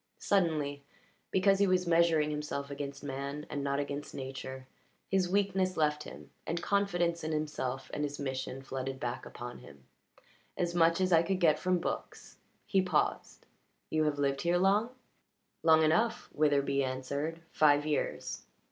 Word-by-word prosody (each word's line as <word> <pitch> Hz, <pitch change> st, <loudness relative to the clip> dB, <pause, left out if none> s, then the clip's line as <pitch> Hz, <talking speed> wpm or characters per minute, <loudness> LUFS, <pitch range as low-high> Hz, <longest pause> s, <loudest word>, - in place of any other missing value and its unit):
Suddenly, 155 Hz, -7 st, 0 dB, 0.5 s
because 195 Hz, +1 st, +3 dB
he 200 Hz, -, +4 dB
was 185 Hz, -1 st, +2 dB
measuring 165 Hz, -3 st, +3 dB
himself 150 Hz, -1 st, -4 dB
against 140 Hz, 0 st, -6 dB
man 140 Hz, +1 st, -4 dB
and 145 Hz, -, -2 dB
not 140 Hz, 0 st, 0 dB
against 145 Hz, 0 st, -4 dB
Nature, 130 Hz, 0 st, -6 dB, 0.5 s
his 190 Hz, -2 st, +2 dB
weakness 190 Hz, -1 st, +1 dB
left 150 Hz, -1 st, +2 dB
him, -, -, -11 dB, 0.2 s
and 170 Hz, -, -1 dB
confidence 175 Hz, -4 st, 0 dB
in 155 Hz, -, -2 dB
himself 140 Hz, -4 st, -3 dB
and 150 Hz, -, -2 dB
his 145 Hz, 0 st, -3 dB
mission 130 Hz, -1 st, -4 dB
flooded 135 Hz, 0 st, -4 dB
back 120 Hz, 0 st, -4 dB
upon 120 Hz, 0 st, -8 dB
him. 70 Hz, -2 st, -15 dB, 0.7 s
"As 175 Hz, -1 st, 0 dB
much 165 Hz, +1 st, +3 dB
as 185 Hz, -1 st, +2 dB
I 165 Hz, -, +7 dB
could 185 Hz, +2 st, -1 dB
get 160 Hz, -4 st, +4 dB
from 185 Hz, -1 st, +2 dB
books." 175 Hz, -, -5 dB, 0.3 s
He 195 Hz, -, +3 dB
paused. 180 Hz, -5 st, -1 dB, 0.5 s
"You 155 Hz, 0 st, +2 dB
have 150 Hz, -1 st, 0 dB
lived 140 Hz, -1 st, 0 dB
here 170 Hz, +1 st, +2 dB
long?" 200 Hz, +5 st, +3 dB, 0.7 s
"Long 160 Hz, -1 st, +6 dB
enough," 220 Hz, +9 st, +2 dB
Witherbee 140 Hz, -2 st, +2 dB
answered. 140 Hz, +5 st, -3 dB
"Five 145 Hz, -1 st, +4 dB
years." 150 Hz, -1 st, -2 dB
150 Hz, 155 wpm, -31 LUFS, 140-175 Hz, 0.7 s, I